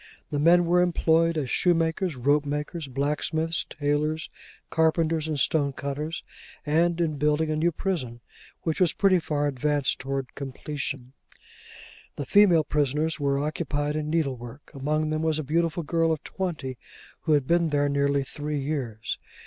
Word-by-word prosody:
The 145 Hz, -, 0 dB
men 175 Hz, +3 st, +5 dB
were 175 Hz, +1 st, +4 dB
employed 165 Hz, -1 st, +2 dB
as 140 Hz, -5 st, -2 dB
shoemakers, 165 Hz, -1 st, +1 dB
ropemakers, 145 Hz, +4 st, 0 dB
blacksmiths, 155 Hz, +4 st, -1 dB
tailors, 150 Hz, +2 st, -1 dB, 0.4 s
carpenters, 160 Hz, 0 st, +2 dB
and 155 Hz, -2 st, -2 dB
stonecutters; 145 Hz, +2 st, -1 dB, 0.4 s
and 165 Hz, +3 st, +2 dB
in 155 Hz, -3 st, 0 dB
building 150 Hz, +2 st, +2 dB
a -, -, 0 dB
new 165 Hz, +3 st, +2 dB
prison, 150 Hz, -, -3 dB, 0.4 s
which 160 Hz, +2 st, -1 dB
was 175 Hz, -4 st, +4 dB
pretty 190 Hz, -2 st, +4 dB
far 150 Hz, -2 st, -1 dB
advanced 145 Hz, 0 st, 0 dB
towards 135 Hz, -1 st, -3 dB
completion. 135 Hz, -2 st, -4 dB, 1.0 s
The 145 Hz, -, -4 dB
female 180 Hz, -1 st, +5 dB
prisoners 150 Hz, +2 st, 0 dB
were 140 Hz, -1 st, +1 dB
occupied 145 Hz, 0 st, -2 dB
in 150 Hz, 0 st, -2 dB
needlework. 135 Hz, -5 st, -3 dB
Among 155 Hz, +2 st, -1 dB
them 155 Hz, 0 st, -1 dB
was 160 Hz, -1 st, +1 dB
a 155 Hz, -, -2 dB
beautiful 165 Hz, +3 st, 0 dB
girl 165 Hz, +1 st, +1 dB
of 155 Hz, -3 st, -2 dB
twenty, 150 Hz, -9 st, -4 dB, 0.4 s
who 155 Hz, -, +1 dB
had 145 Hz, -3 st, +3 dB
been 170 Hz, +2 st, +2 dB
there 145 Hz, -1 st, +2 dB
nearly 140 Hz, 0 st, +1 dB
three 150 Hz, +2 st, -4 dB
years. 130 Hz, -7 st, -3 dB
150 Hz, 145 wpm, -26 LUFS, 140-165 Hz, 1.0 s, men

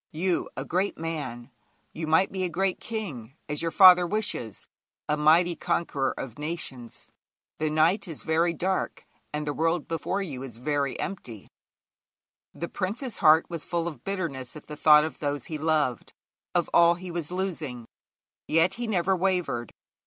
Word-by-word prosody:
You, 175 Hz, +2 st, -1 dB
a -, -, -3 dB
great 185 Hz, +4 st, -1 dB
man 140 Hz, -7 st, -5 dB, 0.4 s
you 160 Hz, 0 st, -4 dB
might 160 Hz, +5 st, +3 dB
be 190 Hz, -1 st, -2 dB
a 180 Hz, -, 0 dB
great 185 Hz, +2 st, 0 dB
king, 150 Hz, -, -6 dB
as 150 Hz, -1 st, -2 dB
your 165 Hz, -, 0 dB
father 180 Hz, 0 st, +8 dB
wishes 200 Hz, -, -2 dB, 0.4 s
a 150 Hz, -, +2 dB
mighty 165 Hz, +3 st, +4 dB
conqueror 140 Hz, -6 st, -1 dB
of 130 Hz, 0 st, -7 dB
nations. 150 Hz, -6 st, -6 dB, 0.5 s
The 155 Hz, 0 st, 0 dB
night 160 Hz, +7 st, +2 dB
is 160 Hz, -4 st, -6 dB
very 165 Hz, +2 st, +2 dB
dark, 185 Hz, +3 st, -2 dB, 0.3 s
and 150 Hz, 0 st, -3 dB
the 145 Hz, -, -2 dB
world 165 Hz, +1 st, 0 dB
before 165 Hz, +4 st, -2 dB
you 140 Hz, -9 st, -6 dB
is 125 Hz, -4 st, -7 dB
very 140 Hz, +1 st, -1 dB
empty.' 125 Hz, -, -6 dB, 1.0 s
The 170 Hz, -, -5 dB
prince's 220 Hz, +8 st, -3 dB
heart 155 Hz, +1 st, +6 dB
was 165 Hz, -3 st, -5 dB
full 170 Hz, -1 st, -2 dB
of 160 Hz, -, -7 dB
bitterness 165 Hz, -11 st, -4 dB
at 150 Hz, -, -10 dB
the 150 Hz, -, -7 dB
thought 150 Hz, 0 st, +6 dB
of 160 Hz, -, -5 dB
those 145 Hz, -3 st, -2 dB
he 155 Hz, -2 st, -5 dB
loved, 150 Hz, -6 st, 0 dB, 0.4 s
of -, -, +2 dB
all 170 Hz, 0 st, +6 dB
that 175 Hz, -, -13 dB
he 185 Hz, -1 st, -6 dB
was 170 Hz, -3 st, -3 dB
losing. 165 Hz, -10 st, -3 dB, 0.6 s
Yet 165 Hz, +3 st, +3 dB
he 240 Hz, -, -1 dB
never 190 Hz, -2 st, +1 dB
wavered. 180 Hz, -, -1 dB
165 Hz, 165 wpm, -27 LUFS, 145-180 Hz, 1.0 s, father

